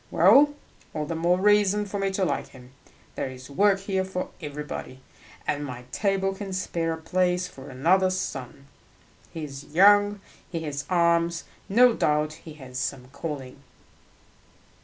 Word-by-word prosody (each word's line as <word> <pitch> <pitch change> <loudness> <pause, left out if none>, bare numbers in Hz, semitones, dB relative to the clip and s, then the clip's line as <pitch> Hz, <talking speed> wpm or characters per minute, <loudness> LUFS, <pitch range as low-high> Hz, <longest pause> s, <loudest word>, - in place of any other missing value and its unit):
"Well, 275 - +6 0.4
all 155 -1 -1
the 165 - -4
more 170 +2 +2
reason 210 0 +3
for 200 0 -4
me 195 0 +1
to 190 -1 +1
like 145 - -2
him. 125 -1 -15 0.4
There - - -3
is 130 +1 -11
work 195 +4 +3
here 195 -1 -1
for 190 -1 -4
everybody, 150 -3 -6 0.5
and 145 0 -1
my 125 -3 -7
table 195 +1 0
can 195 -1 -6
spare 170 -3 -1
a - - -5
place 180 +2 0
for 135 -5 -12
another 180 +9 +3
son. 140 -7 -5 0.7
He 165 -2 -6
is 140 -2 -7
young, 205 +2 +6 0.3
he 165 -3 -3
has 145 -2 -4
arms; 170 -1 +2 0.3
no 240 +4 +6
doubt 150 -4 +1
he 160 0 -12
has 130 -4 -8
some 130 -2 -4
calling." 135 -3 -6
170 Hz, 155 wpm, -26 LUFS, 145-195 Hz, 0.7 s, Well